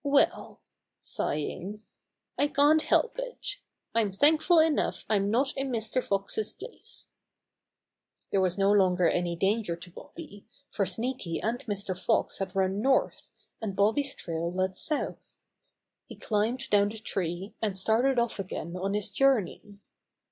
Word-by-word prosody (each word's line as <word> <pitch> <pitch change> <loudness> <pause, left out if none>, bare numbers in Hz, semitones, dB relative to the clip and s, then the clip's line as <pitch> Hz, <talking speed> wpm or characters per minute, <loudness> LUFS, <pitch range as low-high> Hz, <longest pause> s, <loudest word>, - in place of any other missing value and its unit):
Well," 280 -1 +2 0.4
sighing, 190 +8 -3 0.5
"I 290 - +2
can't 295 +2 +4
help 485 +8 +2
it. - - -4 0.4
I'm 220 -3 +2
thankful 310 - +4
enough 315 -1 +2
I'm 200 -2 +1
not 260 +5 +1
in 270 0 -2
Mr. 230 +1 -1
Fox's 200 - -1
place." - - -10 1.2
There 195 - +2
was 185 0 +1
no 195 0 +3
longer 185 -3 +4
any 175 0 0
danger 195 0 0
to 175 +1 -12
Bobby, 205 - -11 0.2
for 195 - 0
Sneaky 230 -8 -3
and 230 +3 -1
Mr. 200 -2 -3
Fox 185 - 0
had 190 -1 -4
run 190 +1 +1
north, 265 +2 +1 0.3
and 205 -4 -3
Bobby's 225 +8 +2
trail 170 0 -3
led 185 +1 -1
south. 300 +9 -4 0.7
He - - -10
climbed 225 +5 -1
down 205 0 +4
the 220 - -7
tree, 190 -3 -3
and 205 -4 -1
started 235 +7 +2
off 235 -3 0
again 180 -2 -5
on 195 +2 -2
his 210 -1 +1
journey. 210 -6 +1
210 Hz, 140 wpm, -28 LUFS, 190-265 Hz, 1.2 s, can't